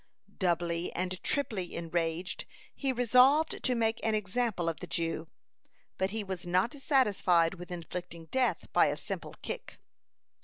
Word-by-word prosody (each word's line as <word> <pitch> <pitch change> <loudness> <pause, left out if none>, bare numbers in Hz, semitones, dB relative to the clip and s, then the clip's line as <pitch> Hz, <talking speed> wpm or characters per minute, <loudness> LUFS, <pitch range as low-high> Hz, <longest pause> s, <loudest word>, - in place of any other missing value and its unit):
(154) 185 - +3
Doubly 170 0 0
and 185 0 -3
triply 215 -11 -1
enraged, 170 +1 -2 0.3
he 270 -2 0
resolved 255 +5 +4
to 255 - +2
make 225 -1 0
an 220 -1 +2
example 210 -2 -1
of 165 - -1
the - - -7
Jew. 165 -1 -2 0.7
But 190 0 +2
he 215 +1 -2
was 190 -3 -5
not 185 +6 +1
satisfied 205 - +3
with 175 +1 -9
inflicting 170 -1 -6
death 260 -1 +1
by - - +6
a - - -1
simple - - -6
kick. - - -6
185 Hz, 150 wpm, -31 LUFS, 170-240 Hz, 0.7 s, by